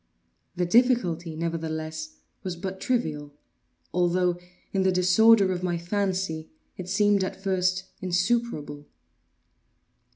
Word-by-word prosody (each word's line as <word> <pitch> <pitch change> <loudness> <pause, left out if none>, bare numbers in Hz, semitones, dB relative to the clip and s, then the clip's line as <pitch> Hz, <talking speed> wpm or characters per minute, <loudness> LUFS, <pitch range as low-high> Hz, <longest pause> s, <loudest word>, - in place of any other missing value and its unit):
The 180 - 0
difficulty, 180 -7 +2
nevertheless, 160 -1 -4 0.3
was 185 -2 -4
but 190 +2 -6
trivial; 150 - -2 0.6
although, 180 0 +1 0.3
in 195 - +2
the 190 0 +3
disorder 190 +3 +5
of 180 -1 -2
my 175 -2 -1
fancy, 185 -3 -2 0.3
it 185 0 -7
seemed 205 +1 +3
at 190 - -4
first 185 -1 0 0.2
insuperable. 180 -6 -1
180 Hz, 105 wpm, -26 LUFS, 165-195 Hz, 0.6 s, disorder